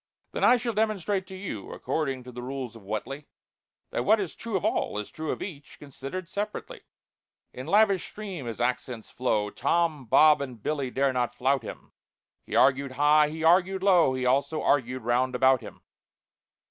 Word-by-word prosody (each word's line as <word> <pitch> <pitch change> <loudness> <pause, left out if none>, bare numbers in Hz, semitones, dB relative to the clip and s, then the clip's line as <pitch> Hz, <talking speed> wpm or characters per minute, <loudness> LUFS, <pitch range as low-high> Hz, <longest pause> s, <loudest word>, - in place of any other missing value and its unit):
"Then - - -3
I 250 - +6
shall 235 -1 -3
demonstrate 205 -3 -1
to 190 - -9
you, 185 - -6
According 135 -1 -3
to 125 - -10
the 125 0 -8
rules 130 -2 -5
of 115 - -12
WHATELY, 110 +8 -5 0.6
That - - -1
what 220 +2 +4
is 190 -5 -3
true 225 -4 -3
of - - -4
all, - - 0
is 105 - -5
true 160 -1 -6
Of - - -4
each, 155 -6 -9
considered 145 +5 -7
separately." 205 +3 -5 0.7
In 130 +3 -8
lavish 200 0 +3
stream 190 - -7
his 115 - -6
accents 125 -2 -2
flow, 105 -5 0
TOM, 155 -1 0
BOB, 150 +5 +6
and 125 -6 -7
BILLY 140 -4 -1
dare 135 +1 +1
not 120 -1 -1
flout 135 +1 +1
him; 110 - -10 0.6
He - - -4
argued 135 0 +3
high, 150 +2 +4
he 160 +1 -6
argued 185 +3 +3
low, 175 -9 +4
He 130 0 -2
also 140 +4 +1
argued 130 -3 +1
round 125 +2 +1
about 130 0 +4
him. 110 - -12
140 Hz, 180 wpm, -27 LUFS, 125-180 Hz, 0.7 s, I